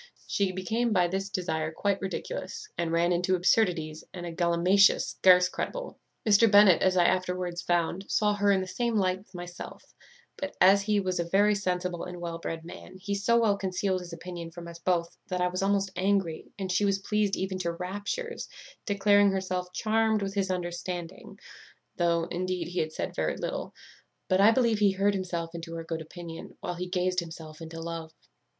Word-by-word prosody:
She 200 -2 0
became 220 +6 -1
by 180 -3 +3
this 195 +2 -3
desire 160 -5 -2
quite 200 +4 -1
ridiculous, 425 - -5
and 170 -1 -1
ran 170 +1 +2
into 180 +2 +2
absurdities 170 -4 +1
and 175 -1 -7
a 170 - -4
gallimatia 175 +3 +4
scarce 180 -1 +5
credible. - - -5 0.3
"Mr. 215 +2 +6
Bennet, 205 -4 +7
as 185 -1 +3
I 175 - +5
afterwards 180 -1 0
found, 175 +2 0
saw 210 -1 +2
her 205 0 +2
in 195 -1 +3
the 185 - -4
same 235 +5 -1
light 185 -2 +1
with 190 -1 -19
myself; 175 0 -9 0.4
but, 285 0 -5
as 195 +2 +6
he 205 0 +1
was 185 -2 -1
a - - +2
very 200 +5 +3
sensible 180 -3 -2
and 180 -1 -7
well 170 -1 -5
bred 165 -1 -5
man, 185 +2 -10
he 195 +2 -4
so 220 +4 +3
well 215 -3 +3
concealed 190 0 -1
his 180 -1 -9
opinion 170 0 -7
from 170 +1 -9
us 170 0 -9
both, 170 -1 0
that 180 -1 -2
I 180 0 +2
was 185 +1 -3
almost 195 -1 +1
angry, 190 -4 0
and 190 -2 -3
she 195 - +2
was 195 -1 +2
pleased 205 0 0
even 190 0 -3
to 170 -2 -1
raptures, 205 - -4 0.4
declaring 205 0 +4
herself 185 -2 -2
charmed 220 +1 +1
with 195 0 -3
his 195 -1 0
understanding, 175 0 -5 0.6
though, 170 -1 +2
indeed, 180 0 -3
he 180 - -2
had 155 0 -1
said - - -4
very - - -1
little; - - -4 0.5
but 185 0 +4
I 205 - +8
believe 230 -2 +3
he 200 -2 +4
heard 200 +1 +2
himself 175 -3 -3
into 165 0 -7
her 165 - -5
good 165 0 -4
opinion, 165 0 -9
while 180 - -4
he 180 +1 -5
gazed 180 0 +1
himself 160 -2 -8
into 165 0 -7
love. 165 -1 -5
185 Hz, 190 wpm, -28 LUFS, 170-200 Hz, 0.6 s, I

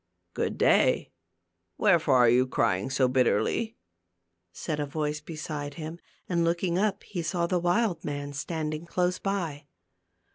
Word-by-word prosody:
" 90 -1 -50
Good - - -2
day; - - +3 0.7
wherefore 165 -8 +4
are 125 -1 +6
you 125 +2 +4
crying 110 -3 0
so 130 -1 +2
bit 125 -1 +3
terly? 225 - 0 0.4
" 90 0 -52 0.3
said 150 - -4
a 145 - -1
voice 150 +1 -2
beside 150 -2 -6
him, 160 +1 -6 0.3
and 170 -2 +1
looking 170 +1 +1
up, 205 -1 0
he 180 -4 -4
saw 170 +1 0
the 180 +1 +1
wild 175 0 +1
man 145 -1 -4
standing 155 +2 -4
close 180 +1 0
by. 175 -8 -3
155 Hz, 155 wpm, -28 LUFS, 140-175 Hz, 0.7 s, are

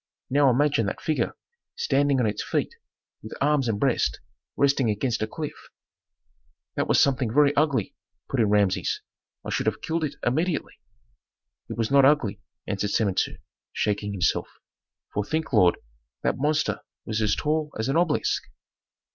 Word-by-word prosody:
Now 140 0 +5
imagine 130 -3 +2
that - - -3
figure 155 - -1 0.4
standing 140 -1 +2
on 125 - +2
its 105 -1 -1
feet - - -1 0.5
with 110 - -8
arms 145 -2 +2
and 105 -3 -1
breast 130 -1 +1 0.4
resting 140 -4 +3
against 115 +3 -1
a 110 - 0
cliff 150 +6 -7 0.5
" - - -45
"That - - 0
was - - +4
something 130 -4 +2
very 145 +2 +4
ugly," 140 -9 +1 0.3
put 135 - -2
in 110 -3 +3
Rameses; 100 -3 +1 0.4
"I - - -4
should - - -1
have - - -1
killed 165 0 -1
it 145 -2 -2
immediately." 155 +7 0 1.0
"It - - -5
was 115 +1 -1
not 140 0 +6
ugly," 125 -8 +3 0.2
answered 100 0 -2
Samentu, 100 -2 0 0.4
shaking 105 0 -1
himself. 95 -3 0 0.7
"For 105 - 0
think, 155 +4 -3
lord, 90 -6 +5 0.5
that - - +1
monster 150 +2 +1 0.3
was 110 0 -2
as 105 - +2
tall 155 0 0
as 110 - -1
an 135 - 0
obelisk." 165 -3 +1
130 Hz, 155 wpm, -25 LUFS, 105-145 Hz, 1.0 s, not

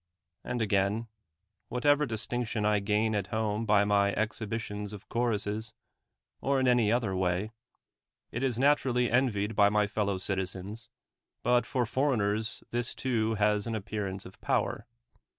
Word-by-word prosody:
And 120 -2 -1
again, 100 +3 +1 0.6
whatever 145 +4 +3
distinction 115 -1 -1
I 105 -1 +3
gain 105 +2 +1
at 100 -2 -1
home 110 0 -1
by 105 -1 +5
my 100 -1 +3
exhi 110 0 -2
bitions 105 -1 -4
of 105 0 -10
choruses, 110 -2 -1 0.7
or 140 0 +2
in 130 - +2
any 120 -4 +4
other 115 -5 +1
way, 95 +3 0 0.8
it 120 - -3
is 130 -4 0
naturally 130 -3 +2
envied 110 -4 +1
by 100 -1 +6
my 105 0 +2
fellow 100 -1 -1
citizens, 95 +4 -4 0.5
but 125 -1 +3
for 125 -2 0
foreigners 110 -4 0
this 120 0 -1
too 115 -4 0
has 105 0 +1
an 115 - -2
appearance 100 -2 -4
of 95 - -13
power. 110 - -1
110 Hz, 145 wpm, -30 LUFS, 105-120 Hz, 0.8 s, by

